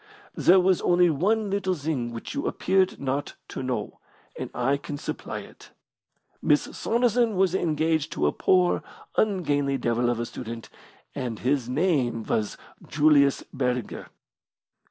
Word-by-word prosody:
There 185 +2 +5
was 185 0 +3
only 175 -1 +4
one 205 +7 +1
little 190 -2 0
thing 140 -6 -2
which 115 - -7
you 285 - -2
appeared 190 -1 +1
not 140 +1 -2
to - - -5
know, 130 -1 -3 0.4
and - - -5
I 135 +3 +1
can 145 +1 -6
supply - - -5
it. - - -15 0.7
Miss 150 0 +3
Saunderson 235 -1 +1
was 185 -1 +2
engaged 160 -3 0
to - - 0
a 75 - +3
poor, 180 - +2 0.3
ungainly 145 -9 +1
devil 120 0 0
of 120 -1 -1
a 120 - -1
student, 115 -1 -8 0.4
and 120 -3 -4
his 130 0 0
name 130 -6 +1
was 105 -1 -1 0.3
Julius 145 -2 +4
Burger." 125 -3 -2
145 Hz, 140 wpm, -26 LUFS, 125-185 Hz, 0.7 s, There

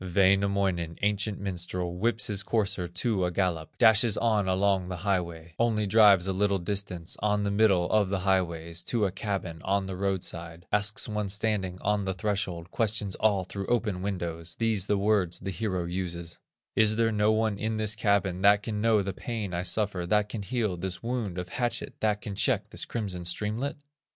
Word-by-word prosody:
Wainamoinen, 95 -2 +2
ancient 105 0 0
minstrel, 90 -2 -3
Whips 115 +6 +1
his 105 -4 -1
courser 100 -4 0
to 95 +3 0
a 90 - +1
gallop, 85 -3 -2
Dashes 110 0 +5
on 110 -4 +2
along 95 0 +2
the 90 - -3
highway; 85 -4 -2
Only 110 -2 +2
drives 100 -3 +6
a 95 - -1
little 100 +1 +2
distance, 90 -2 -3
On 105 -1 +1
the 100 - 0
middle 100 -4 +3
of 105 -3 +3
the 95 -1 -1
highways, 85 -3 0
To 115 -4 +1
a 95 - 0
cabin 95 -4 -4
on 100 0 +1
the 95 -1 -5
road 95 -1 -1
side, 85 0 -6
Asks 105 0 +1
one 105 -2 -2
standing 100 -3 0
on 105 -1 0
the 95 -1 -2
threshold, 90 -4 -3
Questions 105 -3 -1
all 100 -3 +3
through 100 +2 -6
open 110 -6 0
windows, 85 -4 -4
These 110 -4 0
the 105 - +2
words 100 -4 +1
the 95 +1 -5
hero 95 -1 -2
uses: 85 -1 -4 0.4
"Is 110 -1 +4
there 115 0 +2
no 105 0 +3
one 110 -2 +1
in 110 0 -1
this 110 -1 +2
cabin, 100 -4 +1
That 100 +1 +5
can 105 -2 -3
know 110 -2 +3
the 95 0 -3
pain 110 -6 -4
I 85 - -1
suffer, 90 -1 0
That 105 +2 +2
can 105 - -4
heal 105 -3 -1
this 95 +2 -4
wound 115 -6 -2
of 90 0 -4
hatchet, 120 +2 -2
That 105 -1 +1
can 105 - -5
check - - 0
this - - -6
crimson 100 -6 -4
streamlet?" 105 +10 -2
100 Hz, 190 wpm, -28 LUFS, 90-105 Hz, 0.4 s, drives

